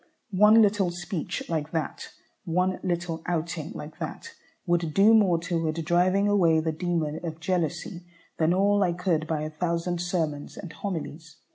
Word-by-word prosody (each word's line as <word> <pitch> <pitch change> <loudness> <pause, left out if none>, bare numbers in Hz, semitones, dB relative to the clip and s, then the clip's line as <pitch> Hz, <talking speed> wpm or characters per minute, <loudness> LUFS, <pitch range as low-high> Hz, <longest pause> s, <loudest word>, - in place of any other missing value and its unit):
One 210 +4 +7
little 200 -3 +2
speech 175 0 -4
like 155 -2 -2
that, 160 -2 -3 0.4
one 180 +2 0
little 175 -3 -2
outing 165 -2 -2
like 150 +1 -8
that, 460 - -6 0.3
would 170 -3 0
do 205 +3 +6
more 200 -6 +5
toward 165 -2 -1
driving 185 +4 +3
away 175 -6 +4
the 160 0 -1
demon 160 -2 -2
of 160 -2 -5
jealousy 175 +1 -2 0.3
than 160 0 +3
all 200 +2 +3
I 180 -3 +2
could 170 -3 0
by 155 -2 -1
a 155 - -4
thousand 170 +2 -2
sermons 160 -5 -2
and 175 -5 -8
homilies. 165 -3 -6
175 Hz, 155 wpm, -26 LUFS, 160-185 Hz, 0.4 s, One